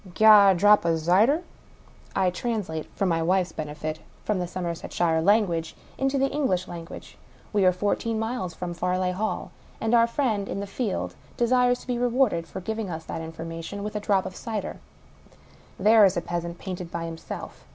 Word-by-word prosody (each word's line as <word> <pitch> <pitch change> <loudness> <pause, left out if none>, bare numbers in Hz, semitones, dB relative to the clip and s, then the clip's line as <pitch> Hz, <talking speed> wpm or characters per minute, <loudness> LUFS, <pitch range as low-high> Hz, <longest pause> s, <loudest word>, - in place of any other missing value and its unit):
Gi' 220 - +3
oi 210 -2 +9
a 190 - +5
drap 205 +4 +5
o' 165 -1 +2
zyder." 200 - +3 0.7
I 185 -1 +2
translate 180 -6 -3
(for 195 - 0
my 165 -3 +1
wife's 180 +2 +1
benefit) 155 +1 -5 0.2
from 210 -3 0
the 180 - -2
Somerset 170 -1 -5
shire 165 -2 +2
language 175 -4 +2 0.2
into 270 +1 0
the 270 - +3
English 190 -12 0
language. 170 -1 -9 0.3
We 200 -2 +3
are - - +6
four 200 +3 0
teen 230 -1 -3
miles 220 -6 -3
from 175 0 -4
Farleigh 180 +1 0
Hall; 215 +4 -3 0.3
and 225 +1 0
our 230 0 +6
friend 230 -5 -1
in - - -3
the 200 - -3
field 200 +1 -3 0.2
desires 245 +1 +3
to - - -14
be 245 -1 -1
rewarded, 240 -9 +1
for 190 - -7
giving 220 +1 -3
us 160 -1 -6
that 165 - -5
information, 165 +4 -6
with 210 +1 -5
a - - 0
drop 200 -2 +1
of 185 - -6
cider. 220 -5 -4 1.0
There 215 +2 +6
is 195 -1 +5
the 175 - 0
peasant, 170 0 -4
painted 180 -2 -6
by 170 0 -4
himself 165 - -8
190 Hz, 190 wpm, -26 LUFS, 170-220 Hz, 1.0 s, oi